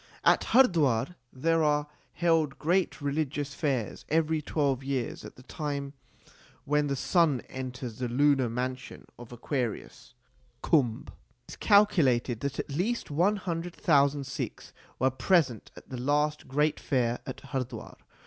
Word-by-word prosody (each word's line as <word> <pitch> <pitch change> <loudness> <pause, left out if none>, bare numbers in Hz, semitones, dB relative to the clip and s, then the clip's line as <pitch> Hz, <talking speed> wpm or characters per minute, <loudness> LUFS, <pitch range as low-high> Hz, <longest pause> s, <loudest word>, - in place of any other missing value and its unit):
At - - +4
Hardwar 165 - +3 0.2
there 165 +4 +1
are 150 -1 +2 0.3
held 165 -5 +1
great 175 +1 0
religious 145 0 -2
fairs 135 -8 -2
every 160 0 +1
twelve 140 -3 -1
years 135 -3 -3
at - - -10
the 125 - -15
time 140 -1 -4 0.7
when 150 +1 +1
the 140 - -1
sun 155 -2 +2
enters 125 -3 -7
the 125 - -1
lunar 135 0 +3
mansion 130 +2 -5
of 120 -1 -11
Aquarius 120 -1 -4 0.5
(Kumbh). 125 -8 +1 0.4
It - - -11
is - - -7
calculated 150 - +3
that 140 +2 -3
at - - -4
least 185 +7 -2
one 180 +8 +2
hundred 175 -3 -4
thousand 140 -2 +3
Sikhs 130 - -6 0.2
were 130 +1 +2
present 130 - +1
at - - -14
the 125 -2 -5
last 150 +3 0
great 150 +3 +1
fair 125 -3 0
at 130 - -6
Hardwar. 130 -4 -5
140 Hz, 140 wpm, -28 LUFS, 130-160 Hz, 0.7 s, At